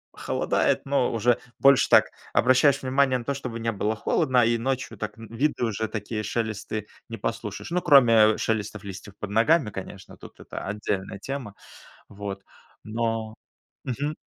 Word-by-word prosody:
холодает, -, -, 0 dB
но 140 Hz, -2 st, +1 dB
уже 115 Hz, +1 st, +2 dB, 0.2 s
больше 140 Hz, -1 st, +5 dB
так -, -, +7 dB, 0.3 s
обращаешь 130 Hz, +2 st, +4 dB
внимание 130 Hz, 0 st, +2 dB
на 120 Hz, -, -9 dB
то, 140 Hz, -, -1 dB
чтобы 125 Hz, -4 st, -6 dB
не 115 Hz, 0 st, -1 dB
было 105 Hz, +1 st, -1 dB
холодно, 130 Hz, +1 st, +2 dB
а, -, -, +4 dB
и 115 Hz, 0 st, +2 dB
ночью 130 Hz, +2 st, -3 dB
так, 105 Hz, -, -5 dB
ну, 115 Hz, -1 st, -10 dB
виды 130 Hz, +2 st, -1 dB
уже 110 Hz, 0 st, -2 dB
такие, 105 Hz, 0 st, -4 dB
шелесты 110 Hz, -1 st, -3 dB, 0.2 s
не 115 Hz, -, -6 dB
послушаешь. 115 Hz, -, -5 dB
Ну, 180 Hz, -, +1 dB
кроме, 140 Hz, -9 st, +6 dB, 0.2 s
а, -, -, -5 dB
шелестов 105 Hz, -2 st, -2 dB
листьев 100 Hz, 0 st, -9 dB
под 105 Hz, -, -5 dB
ногами, 115 Hz, +4 st, +3 dB
конечно, 95 Hz, 0 st, -9 dB
тут -, -, -14 dB
это -, -, -7 dB
отдельная 100 Hz, -1 st, -3 dB
тема. 130 Hz, -7 st, -6 dB, 0.5 s
Вот, 100 Hz, -1 st, -7 dB, 0.4 s
но 115 Hz, 0 st, -2 dB, 0.5 s
Мгм. 145 Hz, +4 st, -2 dB
115 Hz, 165 wpm, -25 LUFS, 105-130 Hz, 0.5 s, так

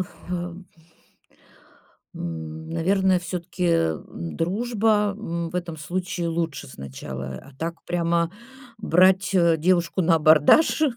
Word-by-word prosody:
ф -, -, -12 dB, 0.2 s
э 175 Hz, +1 st, -4 dB, 1.5 s
н 80 Hz, -1 st, -6 dB
наверное, 185 Hz, +3 st, +2 dB
всё-таки, 180 Hz, 0 st, -4 dB
м, 80 Hz, -, -1 dB
дружба, 210 Hz, +2 st, +1 dB
м, 170 Hz, -6 st, -4 dB
в -, -, -16 dB
этом 175 Hz, -2 st, -3 dB
случае 175 Hz, +3 st, -3 dB
лучше 165 Hz, -2 st, -3 dB
сначала. 65 Hz, 0 st, -7 dB
А 140 Hz, -, -14 dB
так 165 Hz, +1 st, -3 dB
прямо, 170 Hz, -1 st, 0 dB, 0.5 s
брать, 185 Hz, -1 st, +4 dB
э, 170 Hz, -3 st, +4 dB
девушку 175 Hz, +2 st, +1 dB
на 165 Hz, 0 st, +4 dB
абордаж, 155 Hz, -, +5 dB
170 Hz, 115 wpm, -24 LUFS, 155-185 Hz, 1.5 s, абордаж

